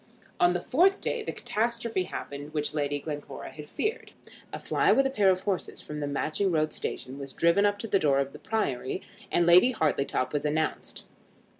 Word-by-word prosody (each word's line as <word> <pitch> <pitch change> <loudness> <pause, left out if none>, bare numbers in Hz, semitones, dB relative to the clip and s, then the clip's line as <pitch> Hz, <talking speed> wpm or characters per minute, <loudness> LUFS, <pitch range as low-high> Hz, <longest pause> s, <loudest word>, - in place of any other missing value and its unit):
On 175 0 +5
the 175 - -1
fourth 370 - +3
day - - -1
the - - -4
catastrophe 230 -3 -1
happened 145 -3 -7
which 150 0 -1
Lady 145 -1 0
Glencora 145 0 -7
had 150 -1 -10
feared. 430 +2 -3 0.4
A - - -4
fly - - +2
with 275 - +4
a 270 - +1
pair 205 -7 +3
of 185 -1 +2
horses 195 -3 -2
from 150 0 -6
the 145 - -2
Matching 155 +7 0
Road 155 -2 +1
station 130 +2 -5
was 140 -1 -7
driven 170 +5 +4
up 205 0 0
to 225 - -5
the 195 - +2
door 145 -4 +3
of 140 0 -1
the - - -10
Priory, 140 - -2 0.3
and 175 - +3
Lady 180 +9 +7
Hartletop 140 - 0
was 145 - 0
announced. 155 +1 -2
165 Hz, 195 wpm, -28 LUFS, 145-205 Hz, 0.4 s, Lady